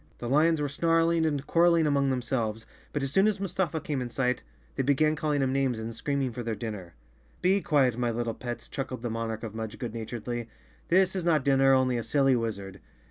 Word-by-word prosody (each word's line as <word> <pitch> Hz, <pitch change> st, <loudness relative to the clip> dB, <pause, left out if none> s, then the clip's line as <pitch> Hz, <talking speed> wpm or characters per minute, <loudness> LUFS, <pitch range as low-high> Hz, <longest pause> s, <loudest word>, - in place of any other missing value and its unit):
The 120 Hz, -, -5 dB
lions 155 Hz, +5 st, +3 dB
were 145 Hz, -, 0 dB
snarling 165 Hz, +2 st, +2 dB
and 145 Hz, -2 st, -2 dB
quarreling 170 Hz, -1 st, +4 dB
among 140 Hz, -2 st, +2 dB
themselves, 120 Hz, -4 st, -2 dB, 0.3 s
but 145 Hz, -, -2 dB
as 135 Hz, -, -1 dB
soon 195 Hz, +7 st, +4 dB
as 210 Hz, -2 st, 0 dB
Mustafa 180 Hz, -4 st, -1 dB
came 150 Hz, -6 st, -3 dB
in 125 Hz, -, -4 dB
sight 125 Hz, +1 st, 0 dB, 0.3 s
they -, -, 0 dB
began 145 Hz, +3 st, +2 dB
calling 150 Hz, -2 st, 0 dB
him 130 Hz, 0 st, 0 dB
names 135 Hz, -3 st, +1 dB
and 110 Hz, +1 st, -5 dB
screaming 140 Hz, +1 st, -1 dB
for 120 Hz, -, -6 dB
their 115 Hz, -2 st, -3 dB
dinner. 105 Hz, -, -6 dB, 0.2 s
" 65 Hz, -2 st, -33 dB
Be 195 Hz, +2 st, +3 dB
quiet, 135 Hz, -8 st, +2 dB
my 120 Hz, -1 st, +1 dB
little 115 Hz, 0 st, -2 dB
pets," 120 Hz, -1 st, -6 dB
chuckled 130 Hz, -3 st, -5 dB
the 120 Hz, -, -2 dB
Monarch 115 Hz, -1 st, -3 dB
of 110 Hz, -2 st, -5 dB
Mudge 110 Hz, -1 st, -5 dB
good 120 Hz, -3 st, -5 dB
naturedly. 120 Hz, +1 st, -5 dB, 0.4 s
"This 190 Hz, +2 st, +3 dB
is 185 Hz, -, -2 dB
not 160 Hz, -5 st, +2 dB
dinner, 135 Hz, -1 st, +5 dB
only 130 Hz, -1 st, +2 dB
a 115 Hz, -, -2 dB
silly 135 Hz, -1 st, +3 dB
wizard." 100 Hz, -5 st, -4 dB
130 Hz, 215 wpm, -28 LUFS, 115-155 Hz, 0.4 s, dinner